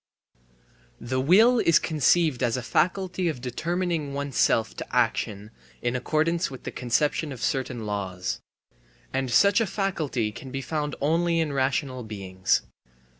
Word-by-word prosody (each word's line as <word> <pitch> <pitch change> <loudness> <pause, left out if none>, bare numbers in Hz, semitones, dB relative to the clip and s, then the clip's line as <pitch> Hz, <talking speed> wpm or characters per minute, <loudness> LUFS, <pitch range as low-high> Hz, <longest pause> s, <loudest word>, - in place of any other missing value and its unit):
The 130 +2 -2
will 215 - +5
is 165 -7 +5
conceived 155 -2 +2
as 120 -1 +1
a 125 - -4
faculty 185 +4 0
of 150 - -4
determining 160 +3 -2
oneself 140 -5 +1
to - - -6
action 110 -3 0 0.3
in 120 +1 -1
accordance 160 +6 0
with 130 -2 -10
the - - -5
conception 145 +4 0
of 130 - -7
certain 125 -3 -2
laws. 95 -3 -3 0.7
And 135 -1 -1
such 200 - +5
a 225 - +1
faculty 160 - -1
can 130 +5 -9
be 135 +1 -4
found 150 +1 -2
only 165 +3 +2
in 155 -3 0
rational 130 -1 0
beings. 95 -4 -1
135 Hz, 140 wpm, -26 LUFS, 120-165 Hz, 0.7 s, will